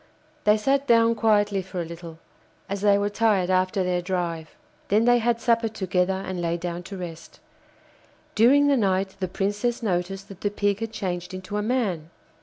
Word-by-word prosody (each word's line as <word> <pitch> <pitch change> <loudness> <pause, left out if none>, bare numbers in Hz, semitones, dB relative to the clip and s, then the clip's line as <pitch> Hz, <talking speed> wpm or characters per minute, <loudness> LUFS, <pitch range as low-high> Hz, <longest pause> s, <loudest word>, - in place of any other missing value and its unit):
They 210 +1 +5
sat 275 +5 +1
down 230 -1 +5
quietly 210 -3 +2
for 185 0 -7
a 170 - -2
little, 165 0 -9 0.5
as 200 0 -4
they 200 -1 +4
were 200 0 0
tired 205 -4 +2
after 185 +1 +1
their 180 -1 0
drive; 175 -3 -3 0.3
then 215 +3 +3
they 245 0 +5
had 235 0 +1
supper 230 -1 +2
together, 190 -2 -1
and 185 -2 -4
lay 170 0 -1
down 175 0 -4
to 195 - -6
rest. 165 -2 -9 0.9
During 270 +6 +5
the 285 -1 +3
night 190 -3 0
the 185 - -1
Princess 205 +6 -2
noticed 195 0 -2
that 195 -2 -12
the 205 - 0
Pig 205 0 0
had 225 -1 -4
changed 185 -4 -4
into 185 +2 -7
a 210 - 0
man. 205 -9 -1
195 Hz, 185 wpm, -25 LUFS, 180-220 Hz, 0.9 s, They